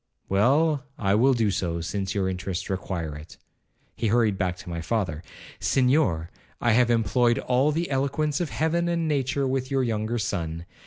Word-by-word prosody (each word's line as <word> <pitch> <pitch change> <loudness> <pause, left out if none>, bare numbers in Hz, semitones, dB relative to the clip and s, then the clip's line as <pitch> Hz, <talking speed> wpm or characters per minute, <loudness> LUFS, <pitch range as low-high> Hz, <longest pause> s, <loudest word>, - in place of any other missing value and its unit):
'Well, 140 +9 +3
I 100 -3 +1
will 130 +5 +4
do 110 -4 +2
so, 85 -3 -2
since 95 +4 -3
your 95 -2 +1
interests 95 0 -3
require 90 -5 -3
it.' 75 +1 -11 0.6
He 115 - -1
hurried 110 -2 +3
back 90 -2 -1
to - - -12
my 85 -1 -4
father. 90 -5 -2 0.4
'Senhor, 125 - +2 0.3
I 120 - +2
have 120 +2 +4
employed 120 +1 +2
all 130 +4 +2
the 165 +3 -1
eloquence 140 +3 0
of 170 - -1
heaven 170 +3 0
and 170 -1 0
nature 140 -2 0
with 130 0 -1
your 135 -2 +1
younger 110 0 -1
son. 85 -5 -3
115 Hz, 170 wpm, -25 LUFS, 95-135 Hz, 0.6 s, will